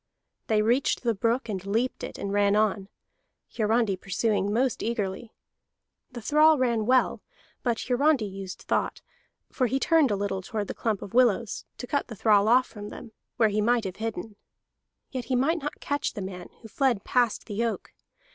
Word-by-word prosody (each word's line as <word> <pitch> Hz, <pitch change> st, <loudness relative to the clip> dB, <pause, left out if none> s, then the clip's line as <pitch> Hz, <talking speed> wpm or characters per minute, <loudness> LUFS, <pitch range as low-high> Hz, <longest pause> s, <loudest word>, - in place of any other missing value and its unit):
They 215 Hz, -1 st, +2 dB
reached 245 Hz, +5 st, +1 dB
the 235 Hz, -2 st, +2 dB
brook, 230 Hz, +5 st, 0 dB
and 195 Hz, -4 st, -4 dB
leaped 225 Hz, +6 st, -1 dB
it, -, -, -6 dB
and 200 Hz, 0 st, -4 dB
ran 205 Hz, 0 st, +3 dB
on, 210 Hz, -2 st, +1 dB, 0.7 s
Hiarandi 220 Hz, -2 st, +2 dB
pursuing 205 Hz, +1 st, -1 dB
most 250 Hz, +3 st, +1 dB
eagerly. 220 Hz, -1 st, -3 dB, 0.8 s
The 240 Hz, -3 st, -8 dB
thrall 305 Hz, +5 st, +5 dB
ran 235 Hz, -4 st, +1 dB
well, 255 Hz, 0 st, +3 dB, 0.4 s
but 235 Hz, -3 st, 0 dB
Hiarandi 265 Hz, -1 st, +2 dB
used 195 Hz, -1 st, -7 dB
thought; -, -, -1 dB, 0.5 s
for 255 Hz, -, +1 dB
he 265 Hz, +4 st, 0 dB
turned 320 Hz, -2 st, +4 dB
a 205 Hz, -, +1 dB
little 195 Hz, -1 st, -2 dB
toward 205 Hz, +1 st, -4 dB
the -, -, -2 dB
clump 220 Hz, -4 st, -2 dB
of 195 Hz, -, -10 dB
willows, 235 Hz, -3 st, +2 dB
and 245 Hz, -, -6 dB
cut 285 Hz, 0 st, -1 dB
the 230 Hz, -, -8 dB
thrall 210 Hz, -1 st, +4 dB
off 250 Hz, +3 st, +5 dB
from 205 Hz, -1 st, -9 dB
them, 225 Hz, -, -10 dB, 0.3 s
where 225 Hz, -2 st, +4 dB
he 210 Hz, +1 st, 0 dB
might 235 Hz, +1 st, +2 dB
have 190 Hz, -2 st, -5 dB
hidden. 220 Hz, -1 st, -5 dB, 0.7 s
Yet 255 Hz, -2 st, -4 dB
he 260 Hz, -, -1 dB
might 310 Hz, +7 st, +1 dB
not 295 Hz, -, -5 dB
catch 285 Hz, 0 st, -2 dB
the 205 Hz, -, -5 dB
man, 180 Hz, -2 st, -7 dB
who -, -, -8 dB
fled 235 Hz, -2 st, 0 dB
past 245 Hz, -3 st, +1 dB
the 215 Hz, +1 st, -2 dB
oak. 230 Hz, -, -3 dB
225 Hz, 185 wpm, -27 LUFS, 205-250 Hz, 0.8 s, thrall